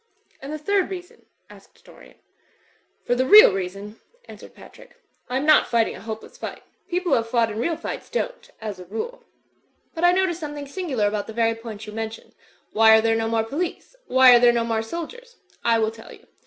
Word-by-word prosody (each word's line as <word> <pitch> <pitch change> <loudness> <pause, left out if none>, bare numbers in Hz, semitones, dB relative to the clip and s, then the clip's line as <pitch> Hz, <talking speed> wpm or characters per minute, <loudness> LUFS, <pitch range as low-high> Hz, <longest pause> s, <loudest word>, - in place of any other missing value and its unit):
"And 275 +2 -7
the 310 - -4
third 385 +5 0
reason?" 360 -2 -10 0.2
asked - - -19
Dorian. - - -17 0.9
*Tor - - +1
the 255 - +1
real 420 - +9
reason," 195 +3 -6 0.3
answered - - -13
Patrick, - - -16 0.3
"I 250 - -1
am 275 - -2
not 310 -1 +5
fighting 230 -2 +1
a - - -11
hopeless 220 0 -8
fight. - - -7 0.3
People 360 0 -1
who - - +5
have 230 0 -3
fought 230 -2 +1
in 215 - -5
real 325 +6 -1
fights 330 - -7
don't, - - -4
as 210 -4 -6
a 180 - -10
rule. 225 - -6 0.7
But 330 - -5
I 350 - +6
noticed 365 -2 0
something 295 -2 -6
singular 280 - -2
about 205 0 -3
the 220 - -8
very 230 0 +1
point 225 -2 -9
you 210 - -9
mention. 225 0 -7 0.4
Why 220 0 +6
are - - +3
there 225 0 +1
no 225 0 -1
more 225 0 0
police? 330 - -5
Why 260 -1 +7
are - - +6
there 240 0 +6
no 235 -1 0
more 225 -1 -1
sol 335 +10 -5
diers? 485 +4 -15 0.3
I 230 -1 +3
will 220 -1 0
tell 225 0 -14
you. - - -16
235 Hz, 210 wpm, -23 LUFS, 220-335 Hz, 0.9 s, real